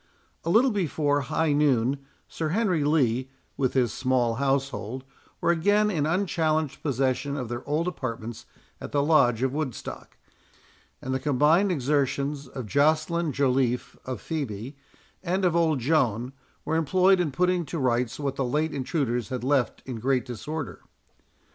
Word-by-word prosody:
A 165 - -2
little 245 +8 +5
before 150 -7 0
high 150 +3 0
noon, 140 -2 +2 0.3
Sir 160 -2 -3
Henry 180 -4 +1
Lee, 130 -4 +1 0.3
with 130 -2 -1
his 125 -4 +2
small 125 -3 +1
household, 135 -3 -1 0.4
were - - +2
again 205 +5 +3
in 150 -5 0
unchallenged 160 -5 0
possession 135 0 0
of 125 -4 -4
their 120 +1 -4
old 155 +4 0
apartments 120 -8 -5 0.3
at - - -7
the 140 -1 +2
Lodge 130 -6 +3
of 130 0 0
Woodstock; 145 -5 -5 0.9
and 130 - -2
the 130 - 0
combined 150 +8 +3
exertions 140 -1 0
of 130 -1 -7
Joceline 155 - +2
Joliffe, 130 -3 0
of 130 -4 -5
Phœbe, 130 -5 -4 0.5
and 185 +1 0
of 175 -2 +2
old 165 -3 +3
Joan, 125 -3 +1 0.3
were 160 - 0
employed 185 +4 +4
in 175 -4 +1
putting 180 +4 +1
to 165 - -5
rights 125 -3 0
what 140 -2 -2
the 135 - 0
late 150 +5 0
intruders 130 - -1
had 125 -2 -4
left 135 -1 +1
in 130 -3 -5
great 130 +2 +1
disorder. 145 +5 -6
140 Hz, 150 wpm, -26 LUFS, 130-160 Hz, 0.9 s, little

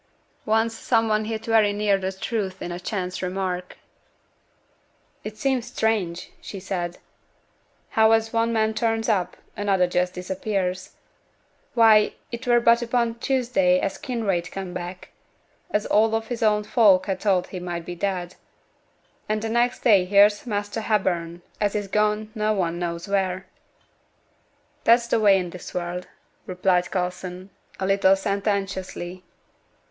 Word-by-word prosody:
Once 225 +1 +2
some 225 -1 +1
one 215 0 +1
hit 220 0 -4
very 220 -2 +4
near 205 0 +2
the 190 -1 -2
truth 190 -1 -3
in 175 - -5
a 175 - -5
chance 185 -1 -4
remark. 180 -1 -3 1.5
'It 215 0 -7
seems 255 0 0
strange,' 205 -8 -1
she 195 - -7
said, 175 -2 -4 0.9
'how 220 0 +4
as 225 0 +2
one 230 0 +2
man 220 -1 +1
turns 225 -1 0
up, 200 -6 0 0.2
another 195 -3 +2
just 180 +1 -1
disappears. 185 0 -3 0.8
Why, 220 -3 +5 0.2
it 235 +1 -6
were 240 -1 +5
but 235 0 +4
upo' 235 -1 0
Tuesday 270 +2 +2
as - - -3
Kinraid 210 -9 -2
come 190 -2 -6
back, 180 +1 -7 0.6
as 210 - 0
all 225 +1 +3
his 230 +1 -6
own 210 -1 +3
folk 200 -5 +4
had 190 -1 -2
thought 185 -3 +1
to 175 -2 -4
be 175 - -7
dead; 180 0 -3 1.0
and 215 +1 -1
next 240 +1 +1
day 200 -6 +5
here's 205 +4 +4
Measter 205 0 -2
Hepburn 175 -5 -1 0.2
as 205 -1 0
is 205 -1 -2
gone 210 +1 0
no 215 -1 0
one 175 -4 -1
knows 170 +1 -4
wheere!' 190 -2 -1 1.4
'That's 235 +1 +5
t' - - +3
way 200 -3 +5
i' 180 - -3
this 180 +1 -10
world,' 180 0 -3 0.4
replied 180 -1 +1
Coulson, 180 +1 -4 0.3
a 190 - -1
little 195 0 +4
sententiously. 195 -2 -3
200 Hz, 140 wpm, -24 LUFS, 180-225 Hz, 1.5 s, Why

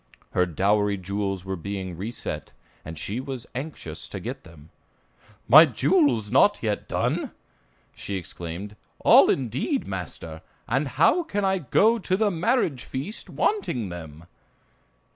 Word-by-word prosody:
Her 90 0 +2
dowry 100 +4 +1
jewels 95 0 -3
were 95 0 -3
being 95 0 -5
reset, 105 +8 -6 0.3
and 80 +1 -8
she 105 +9 -3
was 130 -2 -5
anxious 125 - -6
to - - -6
get - - -6
them. 80 -1 -16 0.8
"My 155 +7 +9
jewels 135 - +2
not 205 +11 +5 0.3
done - - 0
yet!" - - -6 0.6
she 100 - -5
exclaimed, 90 +2 -6 0.3
"All, - - +7
indeed, 135 - -1
master, - - -6 0.3
and - - 0
how 360 - +3
can 205 - -2
I 190 0 +2
go 215 - +3
to 185 -2 0
the 210 -1 +2
marriage 175 - 0
feast, 150 - -6
wanting 125 - -1
them?" 80 -2 -9
115 Hz, 135 wpm, -25 LUFS, -, 0.8 s, My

